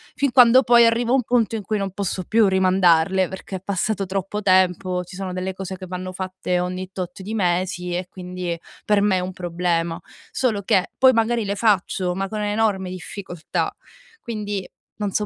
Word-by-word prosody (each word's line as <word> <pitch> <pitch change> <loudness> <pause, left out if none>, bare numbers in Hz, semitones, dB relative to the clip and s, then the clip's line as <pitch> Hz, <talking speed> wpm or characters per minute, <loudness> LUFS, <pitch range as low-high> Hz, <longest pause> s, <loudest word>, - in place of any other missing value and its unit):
fin 280 -2 +1
quando 250 0 +7
poi 240 -2 +6
arrivo 235 +2 +2
a - - +6
un 255 - +2
punto 230 -1 +1
in 210 - -4
cui 215 +1 -1
non 195 -1 -2
posso 195 -1 -2
più 220 +1 +4
rimandarle 185 -1 +3
perché 190 0 -7
è - - -13
passato 200 +1 -1
troppo 195 +2 -3
tempo, 185 -1 +2
ci 180 - -11
sono 190 -1 -4
delle 185 +1 -3
cose 190 0 -5
che 185 -1 -9
vanno 185 +1 -5
fatte 185 -1 -2
ogni 185 +1 -4
tot 180 0 -6
di 215 +3 -5
mesi 180 -2 -1
e 180 0 -2
quindi 180 -2 -5 0.3
per 210 -1 +3
me 205 -2 +3
è - - +1
un 185 +1 -4
problema. 170 -1 -1 0.3
Solo 230 -6 0
che 190 -1 +1
poi 260 0 +7
magari 230 0 +1
le 200 +1 -2
faccio 195 -4 +1
ma 195 +1 -2
con 215 -1 -3
enorme 205 -3 0
difficoltà 180 -2 -4 0.5
quindi 205 -4 -4 0.3
non 205 -2 -2
so 210 - 0
190 Hz, 195 wpm, -22 LUFS, 180-210 Hz, 0.5 s, quando